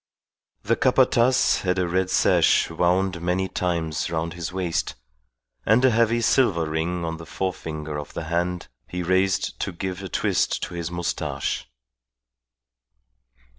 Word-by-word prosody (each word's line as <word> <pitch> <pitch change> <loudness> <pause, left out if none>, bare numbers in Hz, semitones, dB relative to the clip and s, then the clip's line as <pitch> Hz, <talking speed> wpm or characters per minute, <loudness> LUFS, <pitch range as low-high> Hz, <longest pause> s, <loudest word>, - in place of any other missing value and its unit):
The - - +2
Capataz 125 +2 +3
had 90 0 0
a 90 -1 +1
red 95 +2 0
sash - - +3
wound 90 0 +1
many 90 +2 0
times 85 -4 -2
round 80 0 -2
his 85 -1 -5
waist, 90 -3 -2 0.7
and 115 - +4
a 130 - +5
heavy 115 +1 +2
silver 105 -9 +3
ring 85 +3 -2
on 80 0 -3
the 85 - -10
forefinger 80 -5 -4
of 75 - -9
the - - -3
hand 85 +2 -2 0.2
he 90 0 -4
raised 95 +2 +1
to - - -2
give 90 +2 -5
a 95 - -6
twist - - 0
to - - -5
his 85 -1 -4
moustache. 85 -7 -3
90 Hz, 140 wpm, -24 LUFS, 85-95 Hz, 0.7 s, a